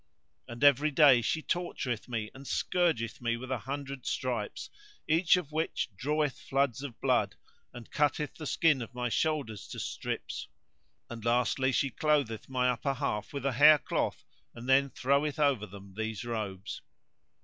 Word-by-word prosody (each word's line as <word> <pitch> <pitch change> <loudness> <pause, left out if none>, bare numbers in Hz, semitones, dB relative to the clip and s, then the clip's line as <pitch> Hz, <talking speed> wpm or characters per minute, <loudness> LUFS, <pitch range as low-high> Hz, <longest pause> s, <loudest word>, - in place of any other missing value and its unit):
[FN#131] - - -7
And 120 - -6
every 145 +1 +6
day 140 -4 +6
she 160 +8 0
tortureth 135 -10 -2
me 110 -3 -3
and 135 +1 -11
scourgeth 145 -7 0
me 115 -1 0
with 130 +2 -8
an 130 - 0
hundred 140 +1 -6
stripes, 130 -3 -3 0.4
each 165 +3 +4
of 160 -5 -5
which 160 -3 -1
draweth 150 +5 -1
floods 135 -2 0
of 140 -5 -7
blood 120 -7 +1 0.4
and 120 -2 -11
cutteth 150 0 0
the 155 - -7
skin 150 -4 +3
of 120 +1 -8
my 125 0 -1
shoulders 140 -7 -1
to - - -7
strips; - - -4 0.6
and 115 -2 -8
lastly 125 +3 +2
she 135 +1 +1
clotheth 140 -7 0
my 125 -1 +1
upper 135 +3 -1
half 115 -7 -2
with 140 -2 -5
a 140 - +2
hair 150 +4 +8
cloth - - -2 0.3
and 120 +1 -9
then 135 +1 +4
throweth 140 +4 +1
over 140 -8 +2
them 100 0 -12
these 110 +1 -4
robes." 105 -5 -4
130 Hz, 165 wpm, -30 LUFS, 115-145 Hz, 0.6 s, hair